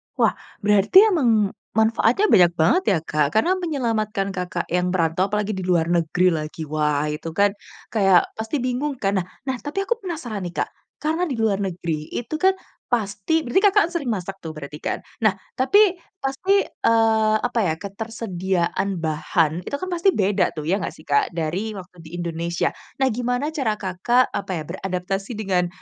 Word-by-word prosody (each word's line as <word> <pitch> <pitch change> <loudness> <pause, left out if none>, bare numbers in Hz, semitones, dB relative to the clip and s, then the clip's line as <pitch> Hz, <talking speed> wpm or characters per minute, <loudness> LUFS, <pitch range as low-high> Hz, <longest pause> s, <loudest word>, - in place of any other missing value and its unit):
Wah, - - +3 0.3
berarti 210 - +4
emang 225 - +3 0.2
manfaatnya 225 - +3
banyak 175 -2 +6
banget 345 - +3
ya, 160 - +1
Kak? 150 -2 +1
Karena 340 +13 +4
menyelamatkan 225 - -1
Kakak 180 -1 -3
yang 180 0 +1
merantau, 170 +2 +1
apalagi 210 +1 -1
di 190 -1 -4
luar 170 -2 +2
negeri, 175 +2 +2
lagi. 155 0 -4
Wah, 150 -1 0
itu 150 +2 -5
kan 200 +1 +4 0.4
kayak 195 -4 +5
pasti 220 +6 -2
bingung, 260 +3 -1
kan? 195 -3 +1
Nah 180 - -3 0.2
nah 265 -1 -1
tapi 345 +7 -3
aku 475 +3 -1
penasaran 295 - -5
nih, 175 - -10
Kak. - - -10 0.3
Karena 320 +4 -1
di 265 - -2
luar 210 -3 +1
negeri, 170 -5 -3
itu 240 +5 -5
kan 380 0 +4 0.3
pasti 225 +7 0
berarti 365 +10 +2
Kakak 395 -3 +3
sering 315 -6 -2
masak 195 -2 -3
tuh, 160 - -6
berarti, 150 0 -8
kan? - - -1 0.2
Nah, 215 -3 +3 0.2
tapi 400 +8 +5 0.3
pasti, 370 +9 +2
eee, 220 -1 +2
apa 245 -1 0
ya, 160 - +1
ketersediaan 195 -3 -2
bahan 160 +1 +1
itu - - -2
kan 370 +3 -5
pasti 350 +2 +3
beda 200 -3 +1
tuh, 155 - -3
ya 190 +5 +1
nggak - - -4
sih, - - -16
Kak? 140 -1 +2
Dari 180 +7 -2
waktu 180 -1 -11
di 165 +1 -10
Indonesia. 170 0 -1 0.3
Nah, 265 - +3
gimana 245 +5 -1
cara 260 -9 0
Kakak, 200 +7 +1
apa 195 - -3
ya, 155 - -4
beradaptasi 195 +4 -4
dengan 185 -4 +1
200 Hz, 175 wpm, -22 LUFS, 175-245 Hz, 0.4 s, banyak